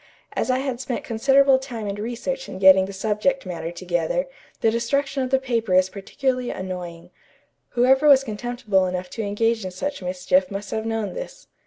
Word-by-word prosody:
As - - -1
I 255 - +3
had 265 -2 -3
spent 255 -2 -3
considerable 270 +3 +4
time 245 -5 -6
and 200 0 -4
research 245 - -4
in - - -7
getting 190 0 +7
the - - -6
subject 215 +7 0
matter 170 -2 -5
together, 175 - -1 0.4
the 225 - +3
destruction 270 +4 0
of 255 - -1
the 265 - +4
paper 230 -7 0
is 185 0 +4
particularly 255 +5 -2
annoying. 180 -3 -6 0.6
Whoever 265 +4 +4
was 275 -2 +7
contemptible 215 -4 -1
enough 180 0 -4
to 230 - -4
engage 220 +2 0
in 185 - -3
such 280 +10 -4
mischief 185 +1 +1
must 200 +1 -6
have 220 0 -2
known 225 -2 -2
this. - - -8
225 Hz, 180 wpm, -23 LUFS, 190-265 Hz, 0.6 s, getting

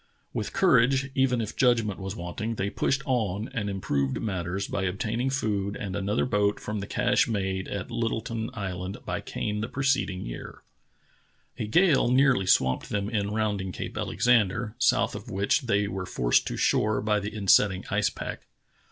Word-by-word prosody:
With - - -3
courage, 135 -5 +3
even 130 -3 +2
if 110 - -5
judgment 115 -6 +2
was 95 +1 -5
want 90 +4 -6
ing, 115 +1 -2
the}' 100 -1 -2
pushed 135 0 0
on 110 -5 -1
and 105 -5 -2
improved 70 -9 -1
matters 95 -2 -2
by 95 - -2
obtaining 115 +7 -1
food 105 -6 -1
and 95 -3 -5
another 100 +3 0
boat 105 -3 +1
from 105 0 -4
the 100 - -5
cache 125 +4 +2
made 95 -4 -2
at 100 -2 -5
Little 115 -1 -1
ton 115 0 -4
Island 95 -2 -4
by - - -3
Kane 105 0 -3
the 110 - -2
preceding 135 -9 0
year. - - -8 1.0
A 110 - -2
gale 155 - +4
nearly 130 -6 +3
swamped 65 -7 +2
them 100 +1 -2
in 100 -3 0
rounding 105 -3 -1
Cape - - -6
Alexander, 115 -2 +1
south 130 0 +3
of 120 - -8
which 100 -1 +1
they 100 -2 +2
were 95 -2 -4
forced - - +2
to - - -3
shore 105 0 +2
by 105 -1 +2
the 105 +1 -4
insetting 100 -2 +3
ice 105 0 +2
pack. - - -7
105 Hz, 175 wpm, -27 LUFS, 95-120 Hz, 1.0 s, gale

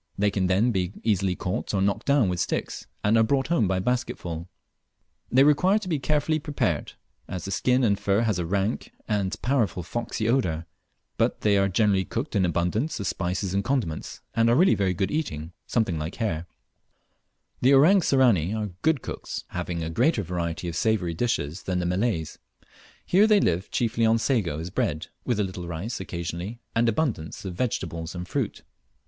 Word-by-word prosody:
They 105 0 +2
can 95 -2 0
then 100 +7 +3
be 95 -2 -1
easily 95 -4 +1
caught 90 +3 -3
or - - +1
knocked 100 0 0
down 140 -6 +4
with 90 -1 -1
sticks, - - -2 0.2
and 105 +2 +3
are - - +5
brought 135 +5 +1
home 130 - +3
by 95 0 +1
basketsfull. 90 -7 -2 0.8
They 130 +2 +6
require 180 +8 +4
to 215 -3 -5
be 160 -5 0
carefully 150 +3 +1
prepared, 140 - -1 0.3
as 90 -2 -5
the 95 - -4
skin 125 +6 +2
and 100 -4 +2
fur 100 +2 +2
has 110 -5 +1
a 85 - -1
rank 100 +4 -1 0.2
end 100 -3 0
powerful 120 -8 +1
foxy 110 +3 -3
odour; 90 -11 +1 0.5
but - - +1
they 105 -1 +3
are 100 0 +3
generally 100 0 +2
cooked 120 +10 -4
with 100 -4 +3
abundance 90 - 0
of 100 - -3
spices 90 +1 -2
and 100 0 +1
condiments, 120 - -2
and 115 0 +4
are 120 - +4
really 180 +7 +5
very 95 -2 +1
good 95 +3 -1
eating, 85 - -3 0.2
something 100 -9 0
like 75 +3 -4
hare. 90 -8 -2 1.1
The 135 +3 +6
Orang 180 +8 +6
Sirani 115 - +3
are 105 -2 -3
good 160 0 +2
cooks, - - -5
having 85 -2 -3
a 80 - -3
much - - -7
greater 120 - +2
variety 85 -1 -3
of 85 - -4
savoury 95 -4 +1
dishes 80 -5 -1
than 90 -1 -2
the 90 - -1
Malays. 90 -3 -1 0.7
Here, 200 +4 +5
they 215 -2 +5
live 90 - 0
chiefly 115 -1 +1
on 115 +1 +4
sago 110 - 0
as 85 +3 -5
bread, 80 -2 -1 0.2
with 120 -4 0
a - - +3
little 90 -2 -5
rice 85 +8 -4
occasionally, 85 +4 -5 0.2
and 115 +1 +3
abundance 110 - -2
of 95 - -4
vegetables 85 -6 -3
and 90 0 -5
fruit. - - -3
100 Hz, 190 wpm, -26 LUFS, 90-120 Hz, 1.1 s, They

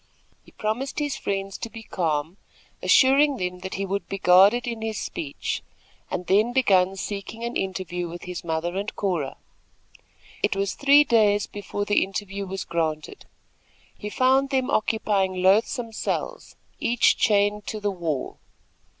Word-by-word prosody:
He - - -18
promised 230 +6 -3
his 290 -2 -1
friends 195 -1 -3
to 230 - -5
be 225 0 -10
calm, 160 -2 -2 0.4
assuring 275 +1 +5
them 180 -2 -3
he 195 - -3
would 200 +1 -3
be 195 - -3
guarded 195 +6 +5
in 230 -2 -4
his 220 -1 -3
speech, 145 -3 -4 0.5
and 180 - -3
then 215 +6 +3
begun 195 -7 +3
seeking 205 +3 -6
an 235 +1 -3
interview 180 -2 -3
with 175 +1 -8
his 180 -1 -6
mother 165 +1 -2
and 205 +2 -4
Cora. 175 -9 -2 1.0
It - - +1
was 195 0 -1
three 285 +1 +6
days 210 -6 +3
before 205 0 -5
the 205 - +3
interview 195 0 -5
was 190 0 -4
granted. 155 -2 -3 0.7
He 210 - -6
found 265 +4 +3
them 265 -1 0
occupying 205 -3 +1
loathsome 225 +5 +2
cells, - - -4 0.2
each 240 0 +3
chained 205 0 +2
to 215 - -4
the 205 -1 -1
wall. 165 -7 -4
200 Hz, 150 wpm, -24 LUFS, 185-230 Hz, 1.0 s, three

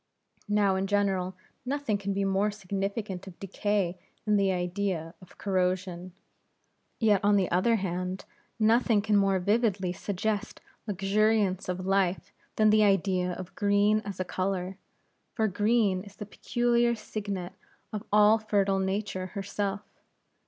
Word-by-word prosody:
Now 205 -2 +3
in 190 +1 -1
general 190 -2 0 0.3
nothing 265 -5 -1
can 200 0 -3
be 195 0 0
more 195 +2 +2
significant 200 -1 -4
of 180 - -11
decay 195 -2 -1 0.3
than 210 -1 +3
the 195 -1 +3
idea 180 -2 -2
of 185 - -17
corrosion; 185 -2 -1 0.9
yet 210 -4 +3
on 205 0 +4
the 190 -3 +1
other 185 +7 +3
hand, 185 -1 -3 0.3
nothing 225 -1 +3
can 215 -1 +2
more 195 -1 +3
vividly 200 -2 +1
suggest 205 +3 -3 0.3
luxuriance 200 -1 +1
of 180 0 -3
life, 195 -1 0 0.2
than 215 -1 +4
the 215 0 +5
idea 190 -3 +2
of 185 0 -8
green 205 +1 +3
as 200 -4 -7
a 185 - -1
color; 185 0 -2 0.6
for 220 -1 +2
green 205 -1 +2
is 200 -1 -14
the 210 - -7
peculiar 240 +2 +1
signet 200 -4 -5 0.4
of 210 - -4
all 210 +1 +6
fertile 200 -2 +1
Nature 190 -1 -2
herself. 200 0 -2
200 Hz, 140 wpm, -28 LUFS, 185-210 Hz, 0.9 s, all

